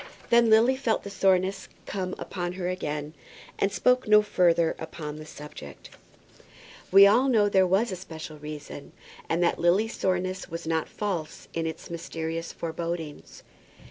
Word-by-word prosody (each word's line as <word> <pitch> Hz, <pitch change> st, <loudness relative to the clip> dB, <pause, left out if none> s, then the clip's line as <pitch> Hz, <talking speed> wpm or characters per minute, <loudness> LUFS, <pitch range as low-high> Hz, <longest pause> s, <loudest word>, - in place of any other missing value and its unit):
Then 235 Hz, -1 st, +5 dB
Lily 225 Hz, +4 st, +5 dB
felt 240 Hz, -5 st, 0 dB
the 200 Hz, -, -7 dB
soreness 190 Hz, 0 st, +1 dB, 0.2 s
come 185 Hz, -2 st, -3 dB
upon 175 Hz, -2 st, -4 dB
her 180 Hz, -1 st, -4 dB
again, 150 Hz, -4 st, -3 dB, 0.5 s
and 195 Hz, -, +2 dB
spoke 250 Hz, +4 st, +2 dB
no 210 Hz, 0 st, +6 dB
further 170 Hz, -5 st, +2 dB
upon 155 Hz, -2 st, -6 dB
the 155 Hz, 0 st, -10 dB
subject. 150 Hz, -, -11 dB, 1.0 s
We 195 Hz, +1 st, +9 dB
all 240 Hz, +7 st, +5 dB
know 225 Hz, -5 st, +4 dB
that 205 Hz, -, 0 dB
there 190 Hz, -1 st, +5 dB
was 195 Hz, +5 st, +2 dB
a -, -, -2 dB
special 160 Hz, -4 st, -9 dB
reason, 150 Hz, -1 st, -8 dB, 0.4 s
and 170 Hz, +2 st, +1 dB
that 170 Hz, -, +1 dB
Lily's 195 Hz, +7 st, +2 dB
soreness 185 Hz, 0 st, -1 dB
was 165 Hz, 0 st, -6 dB
not 160 Hz, -1 st, -1 dB
false 185 Hz, -7 st, -4 dB
in 165 Hz, -1 st, -1 dB
its 160 Hz, -, -7 dB
mysterious 165 Hz, -1 st, -4 dB
forebodings. 165 Hz, -2 st, -6 dB
180 Hz, 155 wpm, -27 LUFS, 160-200 Hz, 1.0 s, We